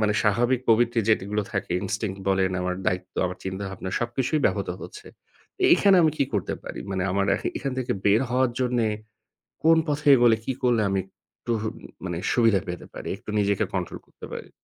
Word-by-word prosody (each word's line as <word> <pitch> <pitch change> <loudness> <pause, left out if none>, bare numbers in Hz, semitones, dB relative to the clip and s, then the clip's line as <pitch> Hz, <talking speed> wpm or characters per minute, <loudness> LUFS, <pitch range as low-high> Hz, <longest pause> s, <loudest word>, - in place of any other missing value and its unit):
মানে 105 -1 +2
স্বাভাবিক 120 +4 +2
প্রবৃত্তি 115 +1 +3
যেগুলো 105 -1 +1
থাকে 100 -3 -3
ইনস্টিংক্ট 100 0 -3
বলেন, 95 -1 +2
আমার 90 0 -1
দায়িত্ব, 90 0 -2
আমার 90 +1 -6
চিন্তাভাবনা 95 0 -5
সবকিছুই 120 +5 0
ব্যাহত - - -1
হচ্ছে। 420 +1 -10 0.7
এখানে 200 - +5
আমি 160 - +4
কি - - +3
করতে 100 - -1
পারি? - - -7
মানে 95 -1 -1
আমার 100 0 +1
এখ - - -7
এখান 135 - -3
থেকে 125 - -1
বের 105 +2 +5
হওয়ার 130 0 +2
জন্যে 125 -2 +1 0.8
কোন 165 0 +6
পথে 150 +1 -2
এগোলে, 120 -3 +5
কি 130 - -1
করলে 120 -3 +3
আমি 95 0 +1 0.4
একটু 120 - -2 0.5
মানে 90 -2 -3 0.2
সুবিধা 115 -5 +4
পেতে 90 0 -6
পারি, - - -6
একটু - - -9
নিজেকে 100 0 +2
কন্ট্রোল 90 -3 -3
করতে - - -12
পারি? - - -7
110 Hz, 175 wpm, -25 LUFS, 95-125 Hz, 0.8 s, কোন